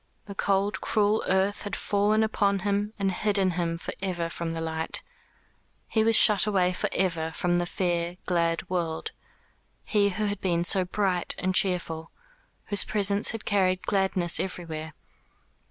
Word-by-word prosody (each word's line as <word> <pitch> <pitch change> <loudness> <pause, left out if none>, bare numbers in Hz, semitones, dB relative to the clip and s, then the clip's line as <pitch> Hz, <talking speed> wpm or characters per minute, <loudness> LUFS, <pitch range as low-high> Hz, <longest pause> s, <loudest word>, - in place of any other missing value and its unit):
The 200 - -8
cold 200 +1 0
cruel 215 0 +1
earth 190 +2 +1
had 205 - -4
fallen 210 +2 +2
upon 200 -3 +1
him 205 +1 0
and 195 -2 0
hidden 195 0 +1
him 170 -1 -2
for - - -6
ever 175 -3 -2
from 165 0 -4
the 165 - -4
light; 160 0 -4 0.8
he 220 - +1
was 225 0 +4
shut 210 -2 +6
away 185 -3 +2
for - - -1
ever 165 -4 -1
from 175 +1 +1
the 175 - -1
fair 175 -1 -1
glad 170 +2 0
world; 170 -3 -2 0.7
he 205 -2 +2
who 210 +2 -2
had 205 -1 -3
been 170 -2 +1
so 185 +1 +3
bright 185 -1 -1
and 185 0 -1
cheerful, 175 -5 0 0.6
whose 205 - +3
presence 205 0 +1
had 225 -1 -4
carried 185 -2 +1
gladness 190 -4 +1
everywhere. 160 -4 -5
190 Hz, 155 wpm, -27 LUFS, 175-205 Hz, 0.8 s, shut